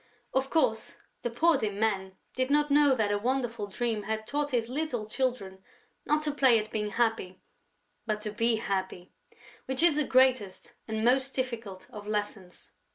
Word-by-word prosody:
Of 265 0 0
course, 225 -9 0 0.2
the 240 - -2
poor 305 +5 +3
dear 215 - -1
man 195 -2 -1 0.2
did 255 0 -1
not 295 0 +2
know 285 -2 +5
that 215 -4 0
a 205 - +1
wonderful 240 -2 -1
dream 225 +2 -2
had 220 +1 -3
taught 290 +4 -2
his 240 -4 0
little 255 -5 -3
children 215 -6 -3 0.4
not 300 +1 +2
to 300 - 0
play 265 -5 +4
at 215 0 -3
being 210 -1 -2
happy, 220 -4 -1 0.7
but 215 -1 -1
to 210 -1 -4
be 230 +2 +1
happy, 190 -4 -3 0.5
which 265 +4 -1
is 335 -4 +5
the 300 - +3
greatest 255 -5 +2
and 220 0 -2
most 260 +2 +2
difficult 230 -7 -4
of 210 -1 -9
lessons. 205 -3 -5
230 Hz, 170 wpm, -29 LUFS, 210-265 Hz, 0.7 s, know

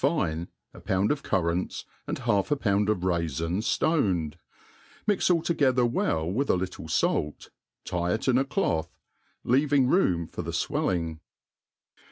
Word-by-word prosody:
^Dc, 90 - 0 0.3
a - - -12
pound 95 +2 +1
of 150 -1 -1
currants, 90 -2 -1 0.2
and - - -2
half 100 +6 0
;i - - +5
)pound 105 -5 +1
of 105 -4 +1
raifins 85 - -1
ftoned 95 - +1
^ - - -24 0.7
inix 205 -3 +2
alt 170 -2 +2
together 130 -7 +3
well 80 -9 0
with 125 +11 -1
a - - +4
little 90 -3 -4
fait, 75 -2 -1 0.3
tie 90 0 -1
it 110 - -2
in 130 -1 +4
a - - +3
clotb^ 85 - 0 0.6
lea¥«' 135 +4 +2
ing 140 -3 +5
room 90 - +2
for - - -6
the - - -6
fwelliog. 85 -3 -1
95 Hz, 160 wpm, -27 LUFS, 85-135 Hz, 0.7 s, i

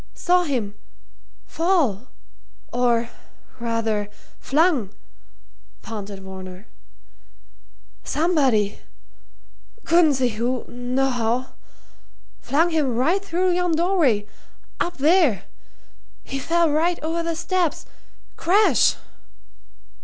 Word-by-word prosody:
"Saw 360 0 +2
him 240 -9 -2 0.7
fall. 305 - 0 0.7
Or 235 -1 +1 0.5
rather 225 -3 -1 0.3
flung!" 295 - +2 0.9
panted 200 -3 -7
Varner. 190 0 -9 1.4
"Somebody 275 - +1 1.1
couldn't 330 -3 +4
see 255 -1 +1
who, 240 +3 -2
nohow 245 -1 -1 0.9
flung 325 +5 +1
him 290 -7 0
right 330 +11 +1
through 370 -1 0
yon 355 -1 +1
doorway, 320 - +2 0.5
up 350 - -2
there. 290 - +3 0.8
He 275 - -5
fell 335 +3 +2
right 335 +3 +1
over 330 +2 -1
the 335 0 -2
steps 345 -1 -1 0.5
crash!" 395 +6 +4
275 Hz, 85 wpm, -22 LUFS, 230-340 Hz, 1.4 s, couldn't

